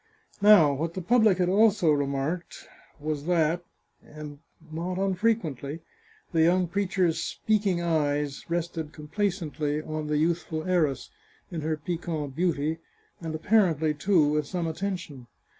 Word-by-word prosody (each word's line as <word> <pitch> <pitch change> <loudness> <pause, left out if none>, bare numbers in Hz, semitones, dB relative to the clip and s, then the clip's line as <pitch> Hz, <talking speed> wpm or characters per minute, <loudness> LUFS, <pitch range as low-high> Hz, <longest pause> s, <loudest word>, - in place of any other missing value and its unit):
Now, 200 -9 +7
what 165 +4 -3
the 185 - -3
public 220 -1 +4
had 180 -1 +1
also 200 -3 +4
remarked, 145 +4 -2 0.3
was 150 -1 -3
that, 170 0 +1 0.6
not 160 +4 -7
unfrequently, 185 - -1 0.5
the 165 - +2
young 180 +2 +3
preacher's 180 -3 0
speaking 200 -2 0
eyes 145 -4 0
rested 165 -2 -3
complacently 155 -3 -2
on 155 0 -5
the 150 0 0
youthful 160 0 -1
heiress, 165 -7 0 0.4
in 165 -3 -4
her 155 +1 -1
piquant 155 -3 -4
beauty, 160 -2 0 0.4
and 160 -1 -4
apparently, 160 -4 +2
too, 155 +2 +3
with 150 0 0
some 175 -1 -2
attention. 165 -6 -4
165 Hz, 125 wpm, -27 LUFS, 150-180 Hz, 0.6 s, Now